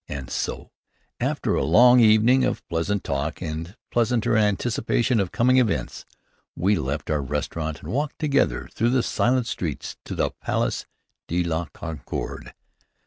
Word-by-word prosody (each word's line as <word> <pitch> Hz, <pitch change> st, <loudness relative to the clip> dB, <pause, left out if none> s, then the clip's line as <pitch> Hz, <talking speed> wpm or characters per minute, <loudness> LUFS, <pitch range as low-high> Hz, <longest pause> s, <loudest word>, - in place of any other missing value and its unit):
And 65 Hz, -2 st, -6 dB
so, -, -, -3 dB, 0.5 s
after -, -, 0 dB
a -, -, +1 dB
long 125 Hz, +2 st, +6 dB
evening 115 Hz, +3 st, +5 dB
of -, -, -2 dB
pleasant 85 Hz, +4 st, -1 dB
talk 70 Hz, +3 st, -2 dB
and 80 Hz, +3 st, -5 dB, 0.2 s
pleasanter 120 Hz, -1 st, +1 dB
anticipation 110 Hz, +3 st, +1 dB
of 95 Hz, -3 st, -1 dB
coming 130 Hz, +2 st, +3 dB
events, 105 Hz, -, 0 dB, 0.5 s
we 95 Hz, +5 st, +2 dB
left 75 Hz, -2 st, -3 dB
our 75 Hz, -1 st, +1 dB
restaurant 75 Hz, +3 st, -3 dB
and -, -, -6 dB
walked 145 Hz, +3 st, -2 dB
together 140 Hz, -3 st, +1 dB
through 115 Hz, -, +1 dB
the 125 Hz, -1 st, +2 dB
silent 125 Hz, 0 st, +1 dB
streets 85 Hz, -, -4 dB
to -, -, -5 dB
the -, -, 0 dB
Place -, -, -1 dB, 0.4 s
de 90 Hz, +1 st, 0 dB
la 85 Hz, 0 st, -1 dB
Concorde. 80 Hz, -6 st, -6 dB
100 Hz, 145 wpm, -24 LUFS, 80-120 Hz, 0.5 s, long